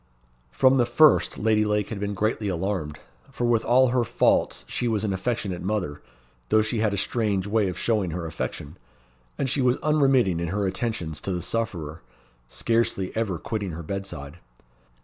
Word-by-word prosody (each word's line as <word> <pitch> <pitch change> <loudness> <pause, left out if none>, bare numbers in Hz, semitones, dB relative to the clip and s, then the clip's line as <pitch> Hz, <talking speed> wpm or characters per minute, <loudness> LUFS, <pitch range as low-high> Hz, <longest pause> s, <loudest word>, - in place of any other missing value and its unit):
From 130 - +4
the 120 -2 +3
first 150 +5 +4
Lady 110 0 +2
Lake 105 -1 0
had 105 - -5
been 100 0 -3
greatly 110 +1 -1
alarmed, 90 -4 -2 0.3
for 120 - -3
with 120 -2 +2
all 130 +1 +4
her 125 0 +2
faults 120 +1 +1
she 120 - -2
was 110 -3 0
an 105 -3 0
affectionate 95 -2 -2
mother, 90 -7 -2 0.5
though 110 - +4
she 110 +1 -1
had 110 -1 +2
a 100 - -2
strange 100 -2 0
way 105 0 +1
of 90 - -6
showing 105 -2 0
her 85 +1 -4
affection; 80 0 -5 0.6
and 135 - 0
she 135 +2 0
was 125 0 +3
unremitting 135 - +3
in 85 - -2
her 100 +4 -1
attentions 95 -5 -3
to 95 - -3
the 90 - -1
sufferer, 85 -9 -3 0.5
scarcely 115 - -1
ever 110 -6 -1
quitting 100 +1 -4
her 85 +2 -6
bedside. 85 -5 -6
105 Hz, 175 wpm, -25 LUFS, 90-115 Hz, 0.6 s, From